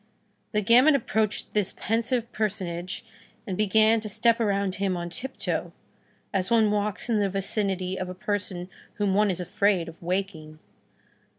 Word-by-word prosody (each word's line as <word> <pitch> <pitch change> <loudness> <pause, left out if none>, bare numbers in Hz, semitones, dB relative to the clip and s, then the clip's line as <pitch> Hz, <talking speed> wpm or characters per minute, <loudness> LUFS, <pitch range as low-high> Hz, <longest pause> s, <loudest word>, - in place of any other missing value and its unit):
The 210 0 +1
gamin 250 +8 +6
approached 220 -5 -1
this 205 -3 +1
pensive 230 +1 0
personage, 185 -3 -3 0.4
and 190 - -3
began 220 +2 +4
to 215 0 -5
step 230 +3 +3
around 200 -3 0
him 195 -2 0
on 175 0 -5
tiptoe, 265 +8 -3 0.6
as 190 -2 0
one 220 -2 +4
walks 210 +1 -1
in 225 -3 +2
the 200 -1 +1
vicinity 190 -1 -1
of 185 -1 -3
a 185 - -6
person 185 -2 -3 0.3
whom 205 -3 0
one 210 +1 +3
is 185 -2 -1
afraid 180 0 +1
of 165 0 -11
waking. 175 -4 -3
200 Hz, 155 wpm, -26 LUFS, 185-220 Hz, 0.6 s, gamin